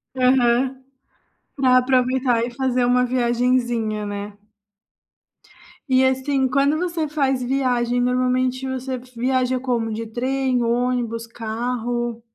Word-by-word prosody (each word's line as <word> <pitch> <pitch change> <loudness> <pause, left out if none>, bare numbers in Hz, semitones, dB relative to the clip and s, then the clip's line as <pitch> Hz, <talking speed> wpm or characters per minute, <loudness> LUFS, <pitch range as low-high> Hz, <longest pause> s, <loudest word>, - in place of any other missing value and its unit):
Aham, 255 0 +2 0.7
para 255 -2 +4
aproveitar 255 -2 +2
e 240 - -4
fazer 255 0 0
uma 250 +1 +3
viagenzinha, 240 -3 0
né. 205 0 -6 1.5
E, 260 0 +4
assim, 265 0 +1
quando 280 +3 +2
você 340 -2 -2
faz 275 -4 0
viagem 245 -2 0
normalmente 255 +1 0
você 260 0 -3
viaja 255 +1 -1
como? 240 -3 -1
De 225 +1 -4
trem, 255 +2 -1
ônibus, 235 -1 -1
carro? 235 +1 -3
250 Hz, 105 wpm, -21 LUFS, 240-260 Hz, 1.5 s, para